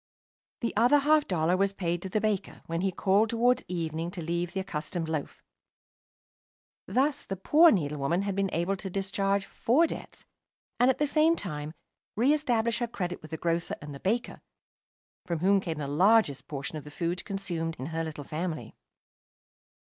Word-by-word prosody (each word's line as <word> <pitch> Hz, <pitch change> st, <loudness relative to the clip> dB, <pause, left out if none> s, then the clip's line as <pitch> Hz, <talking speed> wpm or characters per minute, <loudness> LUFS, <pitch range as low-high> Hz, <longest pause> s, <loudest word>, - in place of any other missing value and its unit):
The 230 Hz, -, -2 dB
other 240 Hz, +7 st, +5 dB
half 300 Hz, +1 st, +3 dB
dollar 175 Hz, -1 st, +2 dB
was 195 Hz, +1 st, +1 dB
paid 175 Hz, -3 st, -2 dB
to 190 Hz, -, -5 dB
the 215 Hz, -, +1 dB
baker 210 Hz, -2 st, -2 dB
when 165 Hz, +1 st, -2 dB
he 190 Hz, 0 st, +1 dB
called 200 Hz, +4 st, +2 dB
towards 240 Hz, +2 st, +2 dB
evening 165 Hz, -1 st, -3 dB
to 175 Hz, 0 st, -7 dB
leave 170 Hz, +1 st, -2 dB
the 190 Hz, -, -3 dB
accustomed 170 Hz, -2 st, -3 dB
loaf. 155 Hz, -3 st, -4 dB, 1.4 s
Thus 285 Hz, +3 st, +1 dB
the 195 Hz, -, -4 dB
poor 305 Hz, -, +6 dB
needlewoman 150 Hz, -, 0 dB
had 200 Hz, -1 st, -2 dB
been 195 Hz, -1 st, +1 dB
able 175 Hz, +4 st, 0 dB
to 190 Hz, 0 st, -6 dB
discharge 195 Hz, +1 st, 0 dB
four 270 Hz, +12 st, +2 dB
debts, -, -, -7 dB, 0.5 s
and, 245 Hz, -, +5 dB
at 260 Hz, -, +2 dB
the 295 Hz, -, +2 dB
same 310 Hz, +3 st, +3 dB
time 155 Hz, -, -5 dB, 0.4 s
re 250 Hz, +7 st, +4 dB
establish 235 Hz, -6 st, +1 dB
her 240 Hz, -, 0 dB
credit 180 Hz, -6 st, -4 dB
with 155 Hz, -, -11 dB
the 160 Hz, -, -4 dB
grocer 170 Hz, +1 st, -1 dB
and 145 Hz, -1 st, -9 dB
baker, 230 Hz, +5 st, -1 dB, 0.9 s
from 170 Hz, -, -1 dB
whom 195 Hz, +4 st, +3 dB
came 165 Hz, -4 st, -4 dB
the 145 Hz, -2 st, -3 dB
largest 150 Hz, -, +3 dB
portion 145 Hz, +1 st, -5 dB
of 150 Hz, -, -7 dB
the 150 Hz, -, -10 dB
food 170 Hz, +4 st, -3 dB
consumed 170 Hz, -5 st, -3 dB
in 130 Hz, -, -5 dB
her 165 Hz, 0 st, -1 dB
little 155 Hz, -2 st, -6 dB
family. 160 Hz, +3 st, -4 dB
185 Hz, 175 wpm, -28 LUFS, 165-220 Hz, 1.4 s, poor